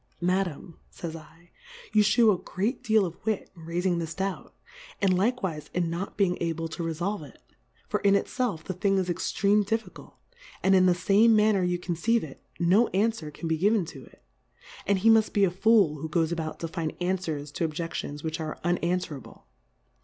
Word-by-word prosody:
Madam, 180 -2 -2
fays 170 -4 -7
J, 165 - -8 0.7
You 215 - +6
fliew 215 +1 +5
a 180 - -5
great 210 +8 -2
deal 220 -2 +3
of 175 -1 -8
Wit, 220 -1 -2
in 165 -2 -12
raifing 175 +1 0
this 160 -1 -4
Doubt, 195 0 -4 0.5
and 195 -2 +3
likewife 190 -6 -1
in 175 -2 0
not 180 +4 -5
being 190 -3 +1
able 165 -1 -2
to 165 - -6
refolve 170 +5 -2
it; 140 -5 -13 0.5
for - - -1
in 200 0 +4
itfelf 205 -4 -1
the 185 - -4
Thing 195 +2 +1
is 185 -2 0
extreme 200 +4 +1
Diffi 225 +3 -2
cult, - - -14 0.5
and 195 - +4
in 185 -1 +5
the 180 - +4
fame 205 +5 +4
manner 210 -2 +4
you 180 0 0
con 175 0 -3
ceive 230 +7 +1
it^ 145 -4 -9 0.2
no 190 +7 +4
anfwer 205 -6 0
can 165 - -6
be 160 -1 0
given 205 0 +3
to 135 -4 -10
it; - - -21 0.3
' - - -18
and 200 0 +3
he 215 +4 +3
muft 220 -1 +3
be 200 - +3
a 190 - +3
Fool, 195 -5 +3
who 160 +2 -5
goes 165 +1 +1
about 160 -2 -4
to 165 - -2
find 160 -1 -4
Anfwers 170 -6 -3
to 165 - 0
Obje£lions 155 -2 -5
which 160 +1 -3
are 155 -1 -4
unanfwerable. 175 -5 -2
180 Hz, 200 wpm, -27 LUFS, 165-200 Hz, 0.7 s, You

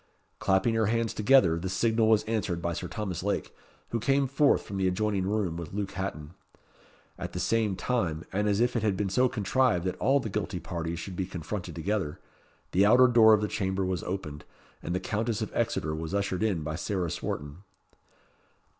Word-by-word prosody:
Clapping 95 +4 +2
her 110 -2 +2
hands 115 0 0
together, 105 -8 +4
the 95 +2 -4
signal 110 +3 +2
was 110 -1 +4
answered 105 -6 -1
by 85 0 -2
Sir - - -4
Thomas 95 -6 -4
Lake, 100 +2 -2 0.4
who 115 - -1
came 135 +4 +2
forth 140 +2 +3
from 100 - -6
the 95 -1 +1
adjoining 95 0 0
room 100 -5 -1
with 85 -1 -7
Luke 100 -1 -3
Hatton. 85 -5 -5 0.9
At - - -5
the 90 - -3
same 110 0 +1
time, 90 -6 -1
and 105 +2 +1
as 100 0 +1
if 120 +1 +2
it 115 - +1
had 105 -3 +1
been 100 -2 -1
so 125 +5 +3
contrived 115 -4 +1
that 90 - -1
all 140 +1 +3
the 115 - -4
guilty 100 -3 -3
parties 85 0 -4
should 90 +2 -6
be 95 0 -2
confronted 90 +2 -5
together, 90 -2 -2 0.5
the 95 - +4
outer 120 +5 +7
door 115 -3 +7
of 105 - -2
the 105 - 0
chamber 95 -1 -1
was 95 -1 -1
opened, 75 -6 -5 0.4
and 85 - -3
the - - 0
Countess 110 +2 -2
of - - -5
Exeter 95 -9 -1
was 80 +4 -4
ushered 100 -2 -1
in 100 -8 0
by 75 0 -3
Sarah 90 0 -2
Swarton. 75 +1 -4
100 Hz, 200 wpm, -28 LUFS, 90-110 Hz, 0.9 s, outer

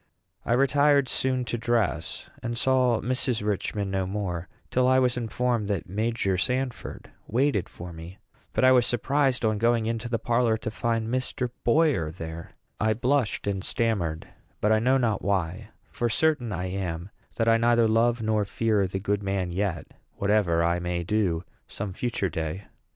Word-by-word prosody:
I 115 - 0
retired 140 +1 +4
soon 130 0 0
to 120 +1 -3
dress, 120 -1 -1
and 120 0 -3
saw 125 -2 +2
Mrs. 125 -3 -1
Richman 100 0 -1
no 95 -1 -1
more 95 -4 -3 0.2
till 125 0 +3
I 130 0 +5
was 125 -2 +3
informed 120 -2 -1
that 100 -6 -2
Major 105 -1 0
Sanford 125 +4 -3 0.2
waited 120 -5 +1
for 85 0 -9
me. 85 +3 -10 0.4
But - - +1
I 130 - +7
was 125 -2 +5
surprised, 130 0 +1
on 110 -1 +1
going 115 0 +2
into 115 +1 -2
the 115 - 0
parlor, 115 -1 +1
to 110 - -5
find 115 0 -1
Mr. 130 +1 -2
Boyer 125 - +3
there. 85 +2 -8 0.3
I 110 0 +2
blushed 125 0 0
and 100 -2 -2
stammered; 90 -9 -1 0.3
but 105 - +2
I 110 - +4
know 130 +4 +3
not 115 -5 0
why; 100 +1 -1 0.2
for 120 - -1
certain 135 -2 +1
I 90 -2 -3
am 90 -1 -4 0.2
that 115 - 0
I 115 0 +5
neither 120 0 +4
love 115 +1 +2
nor 110 -1 +1
fear 105 -1 +1
the 95 - -4
good 100 +1 -1
man 95 -2 -1
yet, 90 -3 -2 0.3
whatever 100 -5 +2
I 85 +1 +1
may 90 0 -2
do 90 -3 0 0.2
some 100 -2 -5
future 115 -1 -1
day. 80 +4 -4
110 Hz, 170 wpm, -26 LUFS, 95-120 Hz, 0.4 s, I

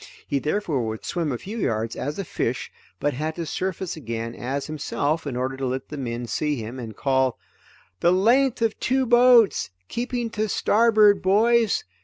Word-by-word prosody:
He 140 - 0
therefore 155 -3 -1
would 110 0 -5
swim 165 -4 -1
a 125 - -2
few 215 - -7
yards 115 - -1
as 145 +2 -4
a 195 - -3
fish, - - -3 0.3
but 145 - 0
had 155 +4 -3
to 170 - -4
surface 185 +2 -3
again 115 -5 -5
as 135 +4 -3
himself 155 0 -2
in 135 - -3
order 130 +2 -2
to 135 -1 -2
let 130 +1 -4
the 150 - -6
men 120 -2 -4
see 150 +6 -1
him, 120 +1 -6
and 110 -3 -7
call: 130 -2 +1 0.6
"The 175 - +4
length 235 +6 +3
of 225 -1 0
two 260 0 +1
boats, 240 - +5 0.2
keeping 240 -1 -3
to 215 -1 -1
starboard, 215 -2 +4
boys. 225 +3 +3
155 Hz, 180 wpm, -24 LUFS, 130-215 Hz, 0.6 s, boats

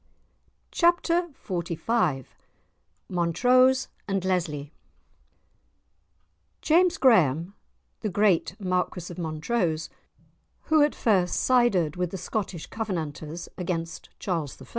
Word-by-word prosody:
*Chapter 345 0 +2 0.2
XLV* 170 - -1 0.8
*Montrose 250 +10 +3 0.2
and 195 -2 -1
Lesly* 155 -6 -1 1.9
James 355 +3 +4
Graham, 175 - +3 0.5
the 215 - -2
great 195 -2 +1
Marquis 180 -2 -2
of 180 - -10
Montrose 160 +1 -2 0.7
who 315 -1 +3
at 295 0 +3
first 190 -6 +2
sided 200 - +2
with 180 -1 -1
the 190 - -6
Scottish 185 -2 -4
Covenanters 165 -6 -5
against 170 -2 -4
Charles 165 -7 -3
I. - - -11
180 Hz, 95 wpm, -26 LUFS, 165-235 Hz, 1.9 s, James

